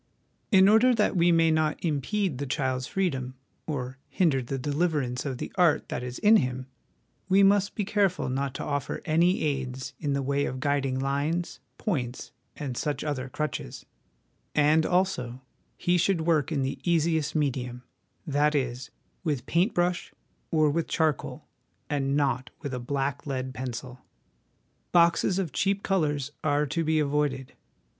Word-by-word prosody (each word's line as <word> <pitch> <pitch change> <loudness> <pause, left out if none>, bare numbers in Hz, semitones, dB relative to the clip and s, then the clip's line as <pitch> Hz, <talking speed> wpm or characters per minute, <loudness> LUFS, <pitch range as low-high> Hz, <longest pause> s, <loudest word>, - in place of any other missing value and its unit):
In 190 -2 +7
order 230 +4 +5
that 210 -2 +1
we 175 0 +4
may 165 -1 +4
not 155 -1 +1
impede 160 +1 -1
the 140 - -3
child's 130 -2 -1
freedom 135 -10 -2 0.3
or 130 -4 -4
hinder 155 -8 +2
the 130 +2 -4
deliverance 145 -2 -1
of 130 -2 -3
the - - -5
art 170 -4 +3
that - - -3
is 125 0 -5
in 215 +2 +6
him, 130 -3 -2 0.6
we 195 +1 +5
must 200 0 +3
be 205 - -1
careful 195 -3 +1
not 135 +1 -2
to - - -4
offer 145 -2 -3
any 170 +3 +3
aids 135 -2 -3
in 145 -3 -1
the 140 0 -1
way 140 +1 0
of 130 - -4
guiding 140 -2 0
lines, 140 +6 -1 0.2
points, 130 - -3 0.2
and 135 -4 -5
such 150 -1 -2
other 135 -4 -3
crutches; 150 - -4 0.7
and, 155 +2 +4
also, 175 -10 0 0.4
he 175 0 +2
should 175 -1 +2
work 160 -2 +1
in 140 -4 0
the 135 - -3
easiest 160 -3 +1
medium, 125 -4 -1 0.4
that 150 0 +2
is, 130 -1 -2 0.3
with 145 -7 -1
paint 175 - +1
brush 175 0 0 0.4
or 155 -2 +3
with 165 +2 -1
charcoal, 160 -4 -1 0.5
and 140 -1 +1
not 130 -3 0
with 140 - -4
a 125 - -2
black 140 +3 -2
lead 130 -1 -3
pencil. 125 0 -6 0.9
Boxes 170 +2 +4
of 185 -6 -1
cheap 200 0 0
colours 150 -7 0
are 145 0 +2
to 165 +4 -1
be 160 0 +1
avoided. 145 -3 0
145 Hz, 155 wpm, -27 LUFS, 130-170 Hz, 0.9 s, In